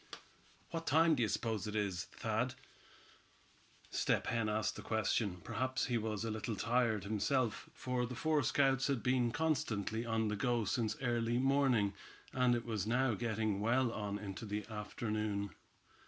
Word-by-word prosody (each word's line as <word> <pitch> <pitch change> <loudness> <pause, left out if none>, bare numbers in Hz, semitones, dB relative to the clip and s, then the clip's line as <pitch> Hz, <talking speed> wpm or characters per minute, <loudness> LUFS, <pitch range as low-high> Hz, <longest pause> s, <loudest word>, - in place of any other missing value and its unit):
"What 165 -1 -4
time 160 +3 +5
d'ye 120 -6 +2
suppose 110 0 -1
it 105 - -4
is, 100 -5 -1
Thad?" - - -2 1.4
Step - - +1
Hen 115 -2 0
asked 110 0 0
the - - -7
question. 105 -4 0
Perhaps 130 +1 -1
he 120 -3 +1
was 110 0 -2
a 115 - -1
little 110 +1 -3
tired 115 -3 +1
himself, 110 +4 0
for 125 -1 -1
the 125 - -6
four 155 +3 +2
scouts 135 +1 +3
had 135 -5 0
been 125 -1 +3
constantly 125 -8 0
on 115 -1 0
the 105 - -1
go 120 +1 +1
since 110 +1 0
early 120 -1 +1
morning, 130 -6 +3 0.4
and 125 -1 +3
it 120 - -3
was 110 -4 -2
now 120 +1 +2
getting 110 -2 -1
well 120 +3 +2
on 105 -2 -3
into 100 0 -6
the 105 +1 -3
afternoon. 105 -1 -2
115 Hz, 155 wpm, -36 LUFS, 105-125 Hz, 1.4 s, time